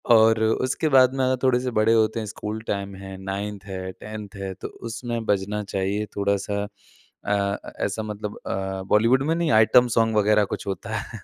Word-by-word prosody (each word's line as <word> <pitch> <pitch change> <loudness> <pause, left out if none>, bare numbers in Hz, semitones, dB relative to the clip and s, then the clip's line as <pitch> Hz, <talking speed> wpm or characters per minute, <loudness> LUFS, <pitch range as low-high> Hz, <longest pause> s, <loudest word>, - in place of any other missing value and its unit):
और 110 0 +5
उसके 130 +7 +1
बाद 130 -1 +6
में 130 - +1
अगर 130 0 +1
थोड़े-से 125 -1 +2
बड़े 110 +1 +4
होते 110 0 +2
हैं, 110 - -4
स्कूल 110 +1 -5
टाइम 100 -1 -3
है, 95 0 -8
9th 100 +1 -4
है, 95 -1 -5
10th 105 0 -9
है, 95 -1 -5
तो 95 - -7
उसमें 115 0 -5
बजना 105 +1 0
चाहिए 100 +2 -2
थोड़ा-सा 100 0 0
अ - - -8 0.6
अ, 100 -1 +1 0.3
ऐसा 105 +2 -2
मतलब 105 -1 -5
अ, 95 0 -3
बॉलीवुड 115 +5 +4
में 165 - +2
नहीं 170 -2 0
आइटम 110 +3 +6
सोंग 115 -1 +3
वगैरह 105 0 +4
कुछ - - -11
होता 95 - -4
है। - - -7
105 Hz, 185 wpm, -24 LUFS, 100-115 Hz, 0.6 s, बाद